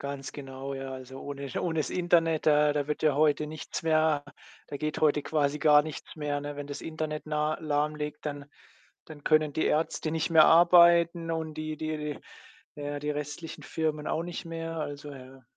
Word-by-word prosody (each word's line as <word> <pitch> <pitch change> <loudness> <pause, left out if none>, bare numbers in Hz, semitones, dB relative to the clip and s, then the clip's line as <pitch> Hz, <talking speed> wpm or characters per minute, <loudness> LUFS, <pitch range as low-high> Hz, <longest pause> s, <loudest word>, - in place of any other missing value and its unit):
Ganz 140 -1 -5
genau, 135 -1 -7
ja, 135 0 -6
also, 130 0 -9
ohne 140 -1 -6
ohne 165 -2 0
das - - -2
Internet, 165 -3 +2
da 150 -1 +5
da 145 -1 -1
wird 150 +1 -3
ja 150 -3 +3
heute 150 0 +2
nichts 155 0 -6
mehr 155 -2 +2 0.4
da 145 - -5
geht 155 +1 -3
heute 150 -1 +3
quasi 150 -1 0
gar 150 -1 +6
nichts 155 0 -8
mehr, 145 -2 -2
ne? 145 0 -5
Wenn 145 0 -7
das 145 - -6
Internet 155 -1 -4
nah 150 0 -1
lahmliegt, 150 0 -2
dann 145 -1 -5 0.6
dann 150 -2 -12
können 155 -1 +3
die 155 - 0
Ärzte 155 0 0
nicht 160 +1 -1
mehr 160 -2 +8
arbeiten 170 0 +6
und 160 -1 -3
die 155 0 -4
die 155 0 -3
die 150 -1 -5 0.6
ja, 145 0 -4
die 150 +1 -2
restlichen 150 +2 -6
Firmen 155 -2 -2
auch 160 - -1
nicht 175 +1 -6
mehr, 165 0 -5
also, 145 -1 -5
ja. 130 0 -12
150 Hz, 190 wpm, -28 LUFS, 145-160 Hz, 0.6 s, mehr